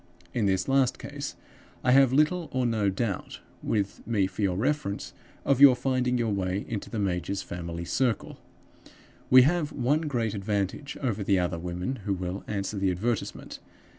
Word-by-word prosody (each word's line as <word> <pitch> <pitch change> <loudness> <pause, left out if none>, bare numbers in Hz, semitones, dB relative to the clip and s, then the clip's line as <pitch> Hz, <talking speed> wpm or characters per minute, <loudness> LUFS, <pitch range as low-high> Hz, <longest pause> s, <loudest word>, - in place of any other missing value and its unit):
In 110 -4 +1
this 95 -1 +1
last 135 -2 +2
case, 140 0 -6 0.5
I 125 - +3
have 135 -1 +6
little 155 +4 +2
or 130 -1 0
no 110 -4 +1
doubt 100 0 -3 0.2
with 100 -3 -1
me 105 -5 +2
for 95 +2 -5
your 95 -3 +1
reference 130 -3 -1 0.3
of 140 -1 +2
your 140 -3 +10
finding 125 0 0
your 115 -2 0
way 95 0 -1
into 105 -3 -4
the 115 - -5
major's 95 -1 -1
family 85 -1 -5
circle. 125 +3 -1 0.9
We 130 0 +9
have 155 +1 +1
one 145 +4 +1
great 120 -9 -1
advantage 100 +7 -2
over 110 -5 -1
the 100 0 +3
other 90 -2 -1
women 90 +9 -3
who 100 -1 -2
will 90 +1 -4
answer 100 0 -3
the 95 -1 +2
advertisement. 105 +5 -3
110 Hz, 165 wpm, -27 LUFS, 95-130 Hz, 0.9 s, your